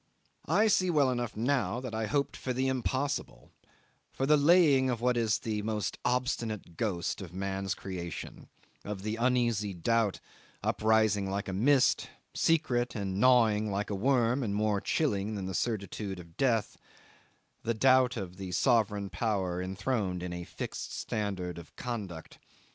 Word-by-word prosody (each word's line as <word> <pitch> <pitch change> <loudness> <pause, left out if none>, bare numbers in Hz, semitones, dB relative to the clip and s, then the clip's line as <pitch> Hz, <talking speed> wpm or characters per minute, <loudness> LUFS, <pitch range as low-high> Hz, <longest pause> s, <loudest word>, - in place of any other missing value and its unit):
I 195 +8 +4
see 190 -4 +3
well 145 -6 +3
enough 120 -3 -3
now 125 -1 0
that 125 -3 -6
I 110 0 -1
hoped 140 +2 0
for 130 - -3
the 130 +2 0
impossible 130 - -2 0.6
for 135 - -2
the 150 +2 +5
laying 145 -3 +5
of 120 -2 -1
what 125 +1 +2
is 115 -2 +2
the 110 -2 -3
most 105 -1 -2
obstinate 120 -7 -1
ghost 95 -2 -2
of 90 -2 -9
man's 95 0 -2
creation, 85 -4 -7 0.3
of 100 -2 -5
the 110 +1 -2
uneasy 120 -5 +1
doubt 110 +3 +1 0.4
uprising 110 -3 +2
like 100 +1 -3
a 95 - -3
mist, 130 +6 +3 0.2
secret 125 -7 +1
and 100 -2 -2
gnawing 115 -4 +4
like 100 +1 -2
a - - -1
worm, 125 +3 +2
and 105 -5 -1
more 105 -1 +1
chilling 105 -8 0
than 100 -2 -4
the 95 - -4
certitude 100 -2 -3
of 85 -1 -13
death 115 -5 +1 0.8
the 115 0 -1
doubt 130 +1 +4
of 90 -3 -6
the 95 -2 -6
sovereign 105 -6 +2
power 95 -2 -1
enthroned 95 -1 -2
in 90 -1 -4
a 90 0 -5
fixed 85 - -6
standard 95 -5 -3
of 85 - -14
conduct. 100 -10 -6
110 Hz, 155 wpm, -30 LUFS, 95-125 Hz, 0.8 s, the